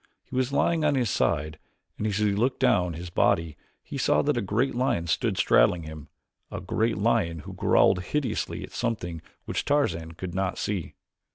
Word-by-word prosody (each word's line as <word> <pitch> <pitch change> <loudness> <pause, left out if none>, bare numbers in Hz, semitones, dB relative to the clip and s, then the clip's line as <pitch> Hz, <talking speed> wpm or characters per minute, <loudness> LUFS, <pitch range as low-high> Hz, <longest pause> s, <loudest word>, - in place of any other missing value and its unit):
He - - -10
was 130 0 +1
lying 160 +3 +2
on 150 -2 +3
his 120 -6 +1
side 75 +1 0 0.4
and 110 - 0
as 100 -2 -1
he 105 -1 +2
looked 120 +6 0
down 105 -10 +2
his 85 +2 -7
body, 80 -2 +2 0.3
he - - -6
saw 75 0 +3
that - - +1
a 120 - 0
great 110 +7 0
lion 120 -9 0
stood 80 - 0
straddling 80 +7 +4
him 80 -1 -9 0.4
a - - -5
great 110 0 0
lion 100 -7 +1
who - - -9
growled 90 - +3
hideously 140 -7 -2
at - - -9
something 90 -9 -3 0.2
which - - -2
Tarzan 85 - 0
could 90 +1 -6
not 95 0 -1
see. 100 -5 -3
100 Hz, 185 wpm, -26 LUFS, 85-120 Hz, 0.4 s, straddling